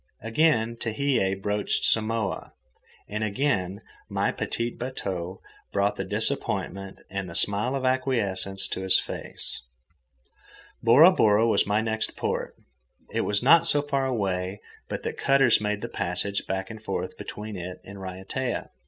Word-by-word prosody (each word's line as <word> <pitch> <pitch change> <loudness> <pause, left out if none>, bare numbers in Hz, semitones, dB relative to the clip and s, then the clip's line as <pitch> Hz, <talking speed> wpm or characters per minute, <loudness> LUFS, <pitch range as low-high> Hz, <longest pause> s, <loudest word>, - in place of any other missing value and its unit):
Again 115 -1 +2
Tehei 115 -5 0
broached 105 +1 0
Samoa, 110 -2 0 0.5
and 105 +1 -3
again 100 -4 0 0.3
my - - +1
petit 115 +1 -2
bateau 95 -8 -5 0.3
brought 100 +1 +1
the - - -3
disappointment 95 0 -2
and 100 -2 -3
the 85 - -8
smile 105 +9 +1
of 130 -1 -2
acquiescence 100 -7 0
to - - -3
his 95 0 +4
face. - - -6 1.2
Bora 135 +10 +8
Bora 110 - +4
was 100 -3 +3
my 105 +1 +2
next 110 0 -1
port. - - -2 0.6
It - - +1
was 105 +2 +2
not 165 +5 +6
so 145 -3 +6
far 140 -2 0
away 95 -5 -1 0.3
but - - -4
that - - -4
cutters 135 -5 +4
made 105 0 -1
the - - -3
passage 90 +3 -1
back 95 +2 -3
and 110 -1 -9
forth - - -3
between 105 0 -7
it 90 0 -6
and 100 0 -10
Raiatea. 95 +7 -4
105 Hz, 145 wpm, -26 LUFS, 95-125 Hz, 1.2 s, Bora